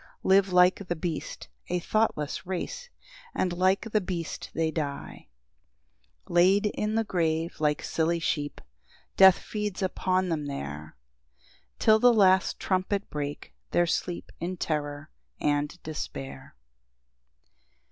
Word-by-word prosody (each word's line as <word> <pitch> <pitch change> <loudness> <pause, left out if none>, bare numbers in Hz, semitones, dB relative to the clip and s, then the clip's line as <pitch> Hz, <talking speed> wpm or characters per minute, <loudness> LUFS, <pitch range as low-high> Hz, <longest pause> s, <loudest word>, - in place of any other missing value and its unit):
Live 190 0 +4
like 180 +2 +4
the 175 - -1
beast, 160 - -5 0.2
a 180 - 0
thoughtless 175 -6 0
race, - - -4 0.5
And 180 -2 0
like 185 +2 +2
the 215 - +2
beast 175 -3 -5
they 160 -1 +1
die. 145 -3 -5 1.0
10 - - -10
Laid 190 +4 +5
in 210 +1 -1
the 225 - +2
grave 165 -4 -1
like 150 -1 +1
silly 165 +1 0
sheep, 145 -3 -2 0.5
Death 190 -1 +8
feeds 210 -3 -4
upon 185 0 0
them 155 -3 -2
there, 75 - -6 0.8
Till 220 0 +5
the 245 +2 +6
last 190 -3 +4
trumpet 190 +2 -1
break 145 -1 -5 0.2
their 175 - +3
sleep 175 +1 -3
In 180 +2 -3
terror 145 -3 -3 0.3
and 145 +2 0
despair. 70 - -7
175 Hz, 125 wpm, -27 LUFS, 150-190 Hz, 1.0 s, Death